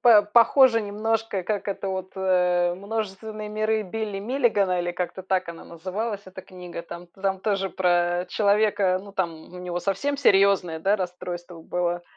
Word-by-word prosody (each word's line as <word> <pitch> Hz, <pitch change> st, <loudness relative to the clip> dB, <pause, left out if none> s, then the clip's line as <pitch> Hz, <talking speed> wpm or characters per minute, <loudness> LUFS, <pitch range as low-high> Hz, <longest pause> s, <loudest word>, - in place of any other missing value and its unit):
по 230 Hz, -3 st, +8 dB
похоже 230 Hz, +3 st, +5 dB
немножко, 215 Hz, 0 st, -1 dB
как 210 Hz, 0 st, -2 dB
это 200 Hz, -1 st, -3 dB
вот, 190 Hz, -1 st, -4 dB
э, 180 Hz, -2 st, +2 dB
"Множественные 215 Hz, +1 st, -5 dB
миры" 215 Hz, +1 st, 0 dB
Билли 210 Hz, 0 st, -4 dB
Миллигана, 210 Hz, -5 st, +1 dB
или 175 Hz, 0 st, -2 dB
как-то 180 Hz, +1 st, -4 dB
так 185 Hz, -1 st, 0 dB
она 170 Hz, -1 st, -8 dB
называлась 195 Hz, +6 st, -4 dB
эта 190 Hz, 0 st, -10 dB
книга. 180 Hz, -2 st, -9 dB
Там 170 Hz, +1 st, -9 dB
там 195 Hz, -1 st, -2 dB
тоже 195 Hz, -1 st, 0 dB
про, 175 Hz, -1 st, +2 dB
э, -, -, -10 dB
человека, 200 Hz, -3 st, +2 dB
ну 200 Hz, 0 st, -12 dB
там, 185 Hz, -4 st, -1 dB, 0.2 s
у -, -, -8 dB
него 175 Hz, -1 st, -4 dB
совсем 200 Hz, +11 st, -1 dB
серьезное, 195 Hz, -, +4 dB
да, 195 Hz, +6 st, +2 dB
расстройство 175 Hz, -2 st, -6 dB
было 175 Hz, 0 st, -1 dB
190 Hz, 165 wpm, -25 LUFS, 180-210 Hz, 0.2 s, по